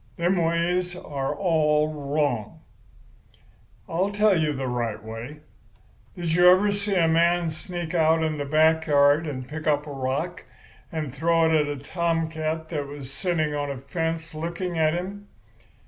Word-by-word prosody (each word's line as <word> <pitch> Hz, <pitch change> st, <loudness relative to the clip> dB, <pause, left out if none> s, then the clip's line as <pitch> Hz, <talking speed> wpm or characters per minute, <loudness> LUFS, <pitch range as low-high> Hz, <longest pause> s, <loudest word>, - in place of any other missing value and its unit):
Them 175 Hz, +3 st, +2 dB
ways 175 Hz, +2 st, 0 dB
are 140 Hz, -6 st, -4 dB
all 155 Hz, -4 st, +2 dB
wrong. 140 Hz, -6 st, -2 dB, 1.3 s
"I'll 180 Hz, +4 st, 0 dB
tell 205 Hz, 0 st, +3 dB
you 155 Hz, -3 st, +1 dB
the 135 Hz, -2 st, -3 dB
right 115 Hz, -3 st, -2 dB
way. 115 Hz, +7 st, -8 dB, 0.7 s
Did 170 Hz, -2 st, -3 dB
you 175 Hz, +2 st, +6 dB
ever 195 Hz, +3 st, +5 dB
see 200 Hz, 0 st, -1 dB
a 170 Hz, -3 st, +4 dB
man 170 Hz, +1 st, +2 dB
sneak 170 Hz, +2 st, -6 dB
out 160 Hz, -1 st, +3 dB
in 155 Hz, -1 st, -1 dB
the 145 Hz, -, -2 dB
back 160 Hz, +2 st, +3 dB
yard 145 Hz, +2 st, +4 dB
and 130 Hz, -3 st, -5 dB
pick 155 Hz, +2 st, -6 dB
up 145 Hz, -1 st, +2 dB
a 150 Hz, -, -7 dB
rock 140 Hz, +6 st, -3 dB, 0.5 s
to 155 Hz, -2 st, -3 dB
throw 165 Hz, +4 st, +2 dB
at 150 Hz, -1 st, +2 dB
a 145 Hz, 0 st, -3 dB
tomcat 160 Hz, +1 st, -2 dB
that 145 Hz, -4 st, -3 dB
was 140 Hz, -2 st, -8 dB
sitting 160 Hz, -2 st, -1 dB
on 145 Hz, -1 st, -2 dB
a 140 Hz, -, -4 dB
fence 160 Hz, +4 st, -3 dB
looking 170 Hz, +3 st, -4 dB
at 160 Hz, 0 st, +2 dB
him? 200 Hz, +3 st, -5 dB
160 Hz, 160 wpm, -25 LUFS, 145-170 Hz, 1.3 s, you